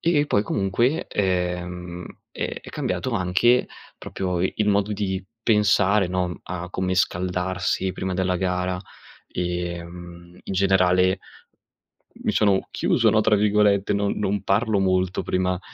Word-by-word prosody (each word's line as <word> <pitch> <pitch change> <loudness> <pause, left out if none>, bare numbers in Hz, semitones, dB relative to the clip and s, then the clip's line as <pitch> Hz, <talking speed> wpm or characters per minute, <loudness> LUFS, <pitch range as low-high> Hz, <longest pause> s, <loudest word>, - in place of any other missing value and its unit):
e 155 -3 +2
poi 100 - +2
comunque, 105 - 0
ehm, 90 -2 -2 0.3
è - - -4
è - - -11
cambiato 90 +7 -2
anche 105 +5 +2 0.3
proprio 90 -2 -3
il 100 +3 0
modo 100 0 +2
di 95 -2 -2 0.2
pensare, 105 -3 +3
no, 90 0 0
mhmm, 85 - -6
a 90 0 -6
come 95 0 -1
scaldarsi 95 +1 0
prima 95 0 -3
della 90 0 0
gara, 90 0 -1 0.5
ehm, 85 0 -5
in - - -6
generale 95 -1 +3 1.1
mi - - +1
sono 100 -3 +2
"chiuso," 115 -2 +2
no, 110 0 +3
tra 105 0 +3
virgolette, 105 -1 +3
non 100 0 0
non 100 -1 -1
parlo 105 +1 +1
molto 95 -1 +1
prima 90 0 0
95 Hz, 135 wpm, -23 LUFS, 90-100 Hz, 1.1 s, pensare